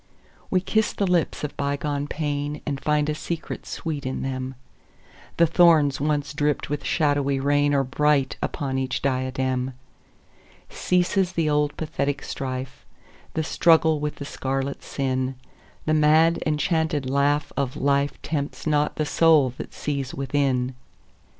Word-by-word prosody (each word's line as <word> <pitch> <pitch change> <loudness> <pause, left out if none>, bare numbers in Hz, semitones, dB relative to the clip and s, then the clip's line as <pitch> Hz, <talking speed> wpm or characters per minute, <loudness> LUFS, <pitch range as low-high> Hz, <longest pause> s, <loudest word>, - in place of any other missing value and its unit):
We 185 - +2
kiss 220 +3 +1
the 200 - 0
lips 180 -5 0
of 150 - -4
bygone 145 0 -2
painAnd 145 -1 -3
find 150 0 +1
a 150 - 0
secret 165 +2 -5
sweet 155 -4 -4
in 130 0 -3
them:The 130 +5 -4
thorns 160 -5 +4
once 145 -1 0
dripped 145 -1 -1
with 145 -1 -2
shadowy 145 -3 +1
rainAre 145 0 +2
bright 140 0 +2
upon 135 -2 -2
each 130 -1 -2
diadem. 130 -1 -1 1.0
Ceases 180 0 +1
the 160 -3 +1
old 150 0 +1
pathetic 145 -3 -2
strife, 130 -1 -5 0.5
The 160 - 0
struggle 160 -1 +4
with 150 0 -3
the 145 - -7
scarlet 135 0 -3
sin:The 130 +3 -4
mad 155 +2 +4
enchanted 155 -2 0
laugh 140 +2 +1
of 135 -2 -1
lifeTempts 140 +1 -1
not 150 -1 +1
the 155 - -1
soul 150 -5 +4
that - - -6
sees 140 -3 -3
within. 135 -2 0
145 Hz, 125 wpm, -24 LUFS, 135-155 Hz, 1.0 s, thorns